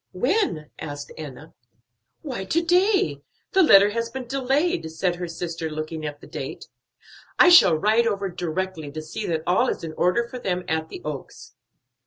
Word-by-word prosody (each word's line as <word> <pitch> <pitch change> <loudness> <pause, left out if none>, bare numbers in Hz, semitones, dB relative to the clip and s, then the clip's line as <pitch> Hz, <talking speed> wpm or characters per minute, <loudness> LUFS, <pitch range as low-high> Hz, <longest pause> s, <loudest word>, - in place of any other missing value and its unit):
"When?" 245 - 0
asked 145 -2 -7
Enna. 150 0 -9 0.7
"Why, 255 -10 -4
to 335 - +1
day! 385 +3 +2 0.3
the 385 - +4
letter 205 - +7
has 230 +1 -2
been 260 +1 -6
delayed," 265 - 0
said 175 +2 -1
her 175 0 -4
sister, 165 -1 -4
looking 155 0 -5
at 145 0 -8
the - - -12
date. - - -7 0.7
"I 355 - +7
shall 195 - +8
ride 220 +7 +3
over 200 -3 -1
directly, 175 -2 -4
to 155 - -5
see 215 +7 -5
that 160 -2 -1
all 185 +9 +2
is - - -4
in 160 -1 -5
order 180 +9 +1
for 250 +1 -7
them 180 -5 -2
at 160 0 -1
the - - -9
Oaks." 150 -3 -7
185 Hz, 175 wpm, -24 LUFS, 160-250 Hz, 0.7 s, shall